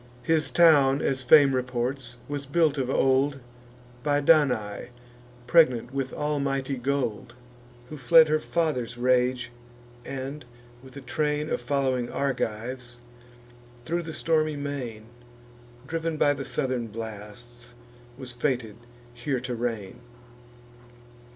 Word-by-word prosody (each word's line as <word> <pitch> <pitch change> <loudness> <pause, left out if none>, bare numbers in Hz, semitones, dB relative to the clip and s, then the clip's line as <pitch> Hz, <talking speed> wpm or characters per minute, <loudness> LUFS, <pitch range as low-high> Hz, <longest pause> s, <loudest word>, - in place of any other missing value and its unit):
His 155 -3 +1
town, 140 -2 +5
as 135 -2 0
fame 135 +2 +6
reports, 125 0 -3
was 145 -1 -5
built 150 -1 +2
of 130 -1 -1
old 135 +1 +2 0.6
By 145 0 +1
Danae, 140 -10 +2 0.6
pregnant 130 -7 +3
with 135 -1 -2
almighty 140 -2 -2
gold, 125 -3 -2 0.5
Who 155 - -7
fled 160 +4 +6
her 155 0 +2
father's 150 -8 -2
rage, 125 0 +1 0.5
and, 135 +3 -6 0.4
with 130 +1 -13
a - - -7
train 150 +2 -2
Of - - -1
following 130 -2 -1
Argives, 125 -2 -3 0.9
thro' 170 +4 -1
the 165 -1 -7
stormy 155 -1 0
main, 135 -7 -5 0.8
Driv'n 165 +2 -3
by 145 -1 +3
the 135 -1 -6
southern 125 -3 -2
blasts, 115 +3 -10 0.4
was 130 -2 -8
fated 120 -4 -2 0.4
here 125 +2 -2
to 125 0 -4
reign. 115 -5 -4
135 Hz, 115 wpm, -26 LUFS, 120-145 Hz, 0.9 s, fame